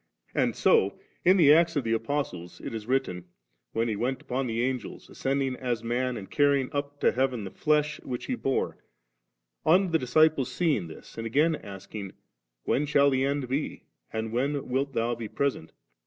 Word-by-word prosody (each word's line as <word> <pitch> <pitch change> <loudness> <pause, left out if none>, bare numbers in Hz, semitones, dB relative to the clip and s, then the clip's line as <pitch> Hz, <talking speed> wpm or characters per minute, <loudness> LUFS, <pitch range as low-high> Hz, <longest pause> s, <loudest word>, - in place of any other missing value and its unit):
And - - +1
so 460 -2 +3 0.2
in 185 +2 +6
the 150 -5 +7
Acts 165 +1 +4
of 145 - +1
the 115 0 0
Apostles 115 -8 -3
it - - -6
is 110 -1 -5
written, 125 -10 -1 0.5
wheo 115 +1 +1
He 110 - -1
went 125 +5 -1
upon 130 +1 -2
the 115 +1 -1
Angels, 130 -2 -3
ascending 135 -1 -1
as 120 -3 -2
man, 125 +1 -1
and 100 -3 -7
carrying 140 -3 +2
up 145 0 -3
to - - +4
heaven 125 -3 0
the 95 - -6
flesh 150 0 +1
which 125 -2 -5
He 260 - -2
bore, 135 - -1 0.8
on 180 +3 +4
the 165 - +3
disciples 140 +1 +3
seeing 155 - +1
this, 80 +7 -11
and 115 - -3
again 150 +7 +3
asking, 100 -3 -8 0.5
'When 145 +2 +1
shall 140 -1 +4
the 130 0 +2
end 140 -1 0
be, 135 +4 -3 0.3
and 110 0 -3
when 140 +4 -1
wilt 135 +2 0
Thou 115 +1 0
be 115 -2 -5
pr#*sent?' 130 -11 -2
130 Hz, 185 wpm, -28 LUFS, 115-145 Hz, 0.8 s, the